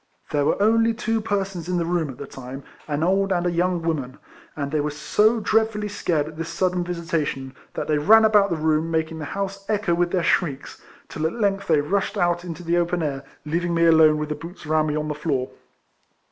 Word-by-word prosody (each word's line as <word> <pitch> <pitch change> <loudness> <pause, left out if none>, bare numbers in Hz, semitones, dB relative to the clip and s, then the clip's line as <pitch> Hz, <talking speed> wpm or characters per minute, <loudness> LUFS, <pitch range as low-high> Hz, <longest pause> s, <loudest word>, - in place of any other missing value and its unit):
There 145 -1 +1
were - - +1
only 225 +2 +3
two 225 -1 -1
persons 195 -5 -3
in 180 - 0
the 170 - 0
room 170 -3 0
at 130 - -8
the 140 - -7
time, 135 +1 -9 0.2
an 150 0 -1
old 195 +2 +2
and 175 -1 +1
a 175 - +1
young 175 0 0
woman, 140 -6 -2 0.4
and 140 -2 -3
they 155 - +1
were 150 +1 0
so 210 +10 +2
dreadfully 220 0 +1
scared 160 -7 -1
at 155 0 -10
this 165 0 -4
sudden 180 +1 0
visitation, 165 -6 -3 0.2
that - - -3
they 150 -1 +2
ran 220 +8 +6
about 210 -2 +4
the 170 - 0
room, 155 +1 +1
making 160 0 -1
the 150 - -5
house 195 +4 -4
echo 210 -4 +1
with 175 +1 +1
their 180 -1 0
shrieks, 145 -8 -1 0.3
till 160 0 -2
at 160 - -5
length 195 -3 0
they 155 -3 +4
rushed 200 +7 -1
out 175 -1 +1
into 175 0 -7
the 170 +1 +1
open 175 0 0
air, 140 -2 -3 0.2
leaving 170 +3 -1
me 165 0 +3
alone 160 -2 +6
with 150 0 -3
the - - 0
boots 170 +2 -10
around 155 0 +2
me 150 - -1
on 155 0 -2
the 150 - -2
floor. 145 -4 -2
170 Hz, 225 wpm, -23 LUFS, 155-195 Hz, 0.4 s, ran